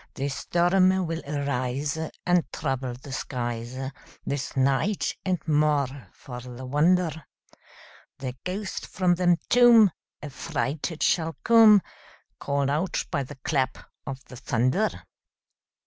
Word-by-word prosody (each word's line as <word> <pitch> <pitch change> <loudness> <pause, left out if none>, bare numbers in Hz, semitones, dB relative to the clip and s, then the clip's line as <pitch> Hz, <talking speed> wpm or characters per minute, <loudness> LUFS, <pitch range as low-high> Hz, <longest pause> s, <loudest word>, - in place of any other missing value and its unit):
The 140 +1 -2
storm 185 +6 +2
will 165 0 -3
arise, 140 0 -2 0.3
And 180 -1 +2
trouble 135 -4 -3
the 135 +3 -11
skies 120 -2 -4 0.5
This 140 -1 -3
night; 140 +10 +1
and, 185 -1 +1
more 145 -5 +1
for 125 -3 -9
the 125 +1 -9
wonder, 160 +2 +1 0.9
The 130 -2 -5
ghost 190 +3 -4
from 180 -2 +1
the 175 -1 +3
tomb 235 -5 +7 0.3
Affrighted 150 +3 -3
shall 165 -2 +1
come, 220 -3 +7 0.6
Call'd 140 -1 0
out 160 +6 -1
by 145 -5 0
the 140 +2 -7
clap 130 -4 0 0.3
of 135 -1 -6
the 125 - -11
thunder. 130 - +1
145 Hz, 115 wpm, -26 LUFS, 130-180 Hz, 0.9 s, tomb